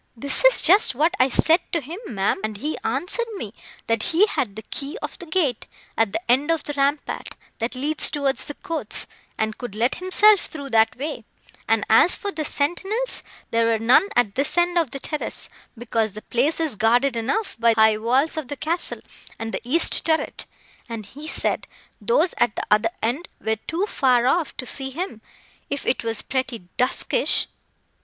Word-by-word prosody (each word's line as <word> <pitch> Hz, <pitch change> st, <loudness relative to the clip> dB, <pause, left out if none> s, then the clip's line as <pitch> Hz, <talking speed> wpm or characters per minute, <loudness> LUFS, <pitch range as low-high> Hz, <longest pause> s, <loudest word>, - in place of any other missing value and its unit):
"That 280 Hz, -, 0 dB
is -, -, +7 dB
just 345 Hz, -, +7 dB
what 315 Hz, +6 st, +2 dB
I 255 Hz, +1 st, +4 dB
said 320 Hz, +6 st, +4 dB
to 335 Hz, -, +2 dB
him, 320 Hz, +7 st, -8 dB
ma'am, 195 Hz, -2 st, 0 dB
and 215 Hz, -1 st, -3 dB
he 300 Hz, +9 st, -2 dB
answered 465 Hz, +6 st, -1 dB
me, 220 Hz, -, -6 dB, 0.3 s
that 230 Hz, -1 st, 0 dB
he 340 Hz, -, +4 dB
had 265 Hz, -, -2 dB
the 220 Hz, -, -8 dB
key 285 Hz, -, -4 dB
of -, -, -7 dB
the 350 Hz, -, -8 dB
gate, 315 Hz, -8 st, 0 dB, 0.3 s
at 225 Hz, -3 st, +1 dB
the -, -, -1 dB
end 275 Hz, +5 st, +2 dB
of 330 Hz, -1 st, +1 dB
the 290 Hz, -, -4 dB
rampart, 285 Hz, +1 st, -1 dB, 0.3 s
that 230 Hz, +3 st, -2 dB
leads 295 Hz, +4 st, +1 dB
towards 280 Hz, -2 st, -1 dB
the 290 Hz, -, -7 dB
courts, 330 Hz, -1 st, -5 dB, 0.3 s
and 220 Hz, 0 st, -2 dB
could 240 Hz, -5 st, -7 dB
let 235 Hz, +4 st, +1 dB
himself 395 Hz, +2 st, +4 dB
through 280 Hz, -3 st, -8 dB
that 225 Hz, -1 st, +3 dB
way; 285 Hz, -2 st, -5 dB, 0.5 s
and 225 Hz, -2 st, +2 dB
as 225 Hz, +10 st, +5 dB
for 410 Hz, -3 st, -4 dB
the 315 Hz, -, -3 dB
sentinels, 385 Hz, +13 st, -1 dB, 0.3 s
there 230 Hz, 0 st, +2 dB
were 230 Hz, -1 st, +2 dB
none 245 Hz, -, +4 dB
at 215 Hz, -5 st, +2 dB
this 275 Hz, +7 st, -1 dB
end 350 Hz, 0 st, +3 dB
of 335 Hz, -6 st, +2 dB
the 275 Hz, -, -6 dB
terrace, 300 Hz, +2 st, -4 dB, 0.3 s
because 225 Hz, -3 st, -1 dB
the 215 Hz, -, -9 dB
place 275 Hz, +8 st, +1 dB
is 315 Hz, -7 st, 0 dB
guarded 240 Hz, +4 st, +3 dB
enough 270 Hz, -, -2 dB
by 230 Hz, -1 st, +4 dB
the -, -, -2 dB
high 220 Hz, -1 st, +5 dB
walls 260 Hz, +8 st, +1 dB
of 310 Hz, -4 st, -3 dB
the 285 Hz, -, -5 dB
castle, 335 Hz, +5 st, -2 dB, 0.4 s
and 225 Hz, 0 st, -5 dB
the -, -, -3 dB
east 305 Hz, +8 st, +4 dB
turret; 320 Hz, 0 st, -1 dB, 0.4 s
and 225 Hz, -2 st, -6 dB
he 290 Hz, +9 st, -10 dB
said -, -, -1 dB, 0.3 s
those 470 Hz, -6 st, +2 dB
at 240 Hz, -3 st, +2 dB
the -, -, -3 dB
other 215 Hz, +2 st, +4 dB
end 265 Hz, +10 st, -1 dB
were 220 Hz, 0 st, -1 dB
too 345 Hz, +5 st, 0 dB
far 255 Hz, -, +2 dB
off 315 Hz, +4 st, +1 dB
to 255 Hz, -, -4 dB
see 265 Hz, +1 st, -3 dB
him, 285 Hz, -, -5 dB, 0.5 s
if 280 Hz, -, -4 dB
it 260 Hz, -, 0 dB
was 225 Hz, -1 st, 0 dB
pretty 255 Hz, -8 st, -3 dB
duskyish." 260 Hz, -, +2 dB
275 Hz, 195 wpm, -23 LUFS, 230-330 Hz, 0.5 s, is